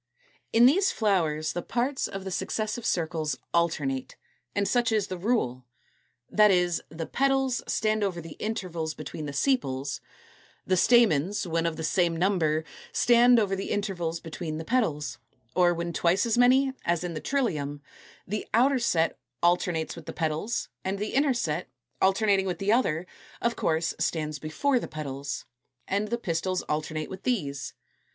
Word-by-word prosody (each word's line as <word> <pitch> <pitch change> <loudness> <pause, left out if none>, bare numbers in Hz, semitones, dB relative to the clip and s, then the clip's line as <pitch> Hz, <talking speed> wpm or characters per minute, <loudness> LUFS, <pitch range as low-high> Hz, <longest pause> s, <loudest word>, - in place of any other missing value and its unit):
= - - -35
In 235 +1 +6
these 370 +10 +5
flowers 160 -8 +1
the 175 - -2
parts 250 +8 -1
of 195 -1 -6
the 190 - -5
successive 215 +4 -2
circles 160 -3 -1 0.2
alternate; 150 -6 0 0.4
and 200 -1 +1
such 240 -2 +2
is 215 -3 +1
the 185 - -3
rule. 130 - 0 0.6
That 210 0 +5
is, 180 -3 +2
the 160 +1 -5
petals 270 0 +1
stand 215 -1 +1
over 185 -4 -1
the 165 -2 -9
intervals 170 -7 -3
between 155 0 -6
the - - -4
sepals; 140 - 0 0.6
the 185 - +2
stamens, 200 - +4
when 165 -1 0
of 165 - -2
the 160 - -4
same 170 0 +1
number, 165 -4 +1 0.3
stand 240 0 +5
over 200 -3 +1
the 195 - -4
intervals 175 -5 -2
between 160 -1 -5
the 160 - -6
petals; 160 - 0 0.4
or 180 -1 +5
when 170 0 -3
twice 180 +7 +2
as 230 - +1
many, 260 +2 +4
as 170 0 0
in 175 -1 -3
the 155 - -5
Trillium, 155 - -1 0.5
the 210 +3 -4
outer 260 +3 +4
set 165 -8 +1 0.2
alternates 175 -2 +1
with 170 -3 -11
the - - -5
petals, 160 +8 -1 0.2
and 190 +1 -2
the 210 +2 -3
inner 275 -1 +3
set, 170 -7 -2 0.3
alternating 195 0 +3
with 180 -2 -2
the 195 +4 0
other, 180 -9 +2 0.3
of 235 0 0
course 165 +1 0
stands 155 -3 -1
before 245 - +1
the - - -5
petals; 140 -2 -5 0.4
and 200 +2 0
the 235 +2 -1
pistils 185 -3 -1
alternate 155 0 -2
with 190 0 -7
these. 145 - -2
180 Hz, 165 wpm, -27 LUFS, 160-220 Hz, 0.6 s, In